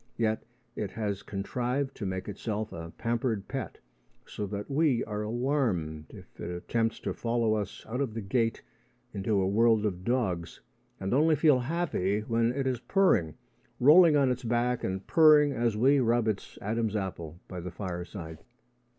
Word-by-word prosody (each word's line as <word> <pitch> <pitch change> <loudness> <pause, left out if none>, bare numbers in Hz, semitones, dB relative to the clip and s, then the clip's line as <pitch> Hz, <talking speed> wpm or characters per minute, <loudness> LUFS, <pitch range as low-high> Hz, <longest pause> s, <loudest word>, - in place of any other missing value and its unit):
Yet 110 -1 0 0.3
it 105 - -3
has 105 -3 -3
contrived 125 +7 -2
to 100 - -3
make 95 0 -4
itself 105 +1 -4
a 85 0 -7
pampered 115 -3 -1
pet, - - -5 0.5
so 105 - -5
that 100 +1 -5
we 140 -4 +2
are 105 -1 -4
alarmed 105 - -1
if - - -14
it - - -5
attempts 115 +6 -1
to - - -2
follow 115 -2 0
us 105 -3 -4
out 125 +5 -2
of 120 -6 -2
the 115 - -3
gate 115 +3 0 0.5
into 100 +1 0
a 95 - +1
world 110 +1 +3
of 90 -3 -2
dogs, 95 -8 -1 0.4
and 95 +2 -2
only 155 +4 +4
feel 150 -3 +4
happy 125 - -1
when 115 +2 +1
it 135 +1 -2
is 130 -2 0
purring 120 - +2 0.4
rolling 155 +3 +7
on 135 -3 +3
its 125 +1 -3
back 120 +1 0
and 95 +1 -3
purring 150 -2 +6
as 115 -3 0
we 135 +5 +4
rub 120 -2 +2
its 105 -3 -3
Adam's 110 +1 -1
apple 85 -5 -4
by 90 - -6
the 90 +1 -5
fireside. 85 -3 -6
115 Hz, 165 wpm, -29 LUFS, 95-125 Hz, 0.5 s, rolling